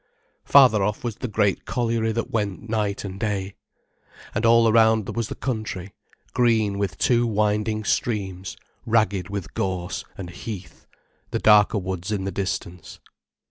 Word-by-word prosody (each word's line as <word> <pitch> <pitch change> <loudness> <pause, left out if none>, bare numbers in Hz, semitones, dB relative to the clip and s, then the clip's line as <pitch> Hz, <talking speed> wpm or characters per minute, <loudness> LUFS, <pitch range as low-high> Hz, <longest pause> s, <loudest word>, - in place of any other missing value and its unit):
Farther 130 -7 +6
off 105 +3 -2
was 115 -3 -3
the 125 - -4
great 105 -2 0
colliery 115 -2 0
that 115 +1 -3
went 105 -1 -2
night 105 -3 -1
and 95 0 -6
day. 100 -3 -2 0.8
And 110 +3 +1
all 115 0 +6
around 110 -2 +3
was 115 -2 -1
the - - -6
country, 110 -7 -4 0.4
green 110 -5 +2
with 100 -1 -2
two 120 -1 +2
winding 105 0 0
streams, 95 -4 -2 0.3
ragged 105 -5 +1
with 100 -3 -5
gorse, 95 -2 -3
and 90 -3 -7
heath, 90 -7 -8 0.4
the - - -1
darker 105 0 +5
woods 95 0 -4
in 100 -3 -1
the 95 - -3
distance. 90 -3 -5
105 Hz, 145 wpm, -24 LUFS, 95-115 Hz, 0.8 s, Farther